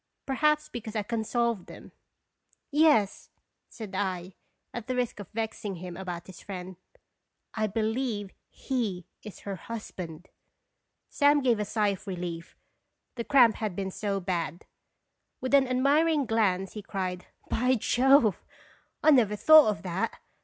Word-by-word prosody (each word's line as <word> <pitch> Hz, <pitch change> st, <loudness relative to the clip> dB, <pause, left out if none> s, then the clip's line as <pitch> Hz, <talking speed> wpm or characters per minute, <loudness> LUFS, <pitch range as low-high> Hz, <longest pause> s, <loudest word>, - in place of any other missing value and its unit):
Perhaps 300 Hz, +2 st, +2 dB
because 225 Hz, -2 st, -7 dB
I 210 Hz, -, 0 dB
can 225 Hz, +1 st, -2 dB
solve 235 Hz, -3 st, -1 dB
them. -, -, -12 dB, 0.4 s
" -, -, -55 dB, 0.3 s
Yes," 295 Hz, -9 st, +3 dB, 0.4 s
said 215 Hz, -4 st, -9 dB
I, 185 Hz, -2 st, -2 dB, 0.4 s
at 235 Hz, -2 st, -6 dB
the 255 Hz, -, -1 dB
risk 245 Hz, -3 st, -1 dB
of 200 Hz, -, -8 dB
vexing 220 Hz, -2 st, -4 dB
him 180 Hz, 0 st, -7 dB
about 175 Hz, -2 st, -6 dB
his 185 Hz, -, -12 dB
friend, 185 Hz, -2 st, -7 dB, 0.5 s
"/ 215 Hz, -3 st, -5 dB
believe 220 Hz, -2 st, -1 dB, 0.2 s
he 215 Hz, -, -3 dB, 0.2 s
is 210 Hz, -, -10 dB
her 200 Hz, -1 st, -5 dB
hus 230 Hz, +4 st, -7 dB
band." 170 Hz, -1 st, -8 dB, 0.8 s
Sam 290 Hz, 0 st, +4 dB
gave 240 Hz, -4 st, +3 dB
a 210 Hz, -, -1 dB
sigh 210 Hz, 0 st, +1 dB
of 200 Hz, +1 st, -5 dB
relief, 175 Hz, -2 st, -5 dB, 0.6 s
the 235 Hz, -, -4 dB
cramp 240 Hz, -4 st, +5 dB
had 215 Hz, -5 st, -3 dB
been 190 Hz, 0 st, -3 dB
so 200 Hz, 0 st, -2 dB
bad. 175 Hz, -3 st, -3 dB, 0.7 s
With 260 Hz, +1 st, -4 dB
an 275 Hz, -2 st, +6 dB
admiring 285 Hz, +4 st, +3 dB
glance 195 Hz, -5 st, +1 dB
he 210 Hz, -, -6 dB
cried 185 Hz, -2 st, -4 dB, 0.2 s
"By 250 Hz, +3 st, +2 dB
Jove! 250 Hz, -1 st, +3 dB, 0.6 s
I 310 Hz, -, +7 dB
never 225 Hz, -7 st, +4 dB
thought 310 Hz, +6 st, +8 dB
of 200 Hz, -1 st, -3 dB
that. 180 Hz, 0 st, -2 dB
215 Hz, 150 wpm, -28 LUFS, 190-250 Hz, 0.8 s, thought